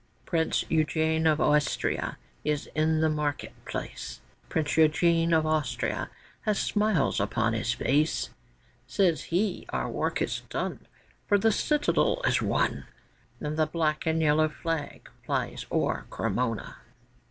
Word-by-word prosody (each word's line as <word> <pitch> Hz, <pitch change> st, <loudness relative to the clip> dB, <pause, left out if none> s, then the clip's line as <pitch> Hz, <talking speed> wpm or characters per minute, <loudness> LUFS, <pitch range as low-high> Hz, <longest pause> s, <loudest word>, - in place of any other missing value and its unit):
Prince 165 Hz, -2 st, +1 dB
Eugène 160 Hz, 0 st, +2 dB
of 150 Hz, -, 0 dB
Austria 150 Hz, -2 st, +1 dB, 0.3 s
is 150 Hz, -1 st, 0 dB
in 155 Hz, 0 st, +2 dB
the 160 Hz, -, +4 dB
market 150 Hz, -2 st, -2 dB
place; -, -, -6 dB, 0.3 s
Prince 155 Hz, -2 st, 0 dB
Eugène 165 Hz, +1 st, +3 dB
of 160 Hz, -1 st, +4 dB
Austria 145 Hz, -6 st, -1 dB, 0.3 s
has 210 Hz, -2 st, 0 dB
smiles 210 Hz, -3 st, +1 dB
upon 115 Hz, -1 st, +1 dB
his 115 Hz, +1 st, 0 dB
face; 140 Hz, -, +1 dB, 0.6 s
Says 180 Hz, -5 st, +1 dB
he, 185 Hz, +3 st, -1 dB
'Our -, -, -1 dB
work -, -, -1 dB
is -, -, -1 dB
done, -, -, -4 dB, 0.4 s
For 205 Hz, -, +5 dB
the 220 Hz, +3 st, +3 dB
Citadel 300 Hz, -, +2 dB
is -, -, +3 dB
won, -, -, 0 dB, 0.5 s
And 150 Hz, +1 st, -3 dB
the 155 Hz, -1 st, +3 dB
black 155 Hz, 0 st, -1 dB
and 160 Hz, 0 st, +2 dB
yellow 155 Hz, +1 st, +4 dB
flag 160 Hz, -1 st, -4 dB, 0.2 s
flies -, -, -2 dB
o'er -, -, 0 dB
Cremona. 115 Hz, -3 st, -2 dB
155 Hz, 130 wpm, -28 LUFS, 150-165 Hz, 0.6 s, For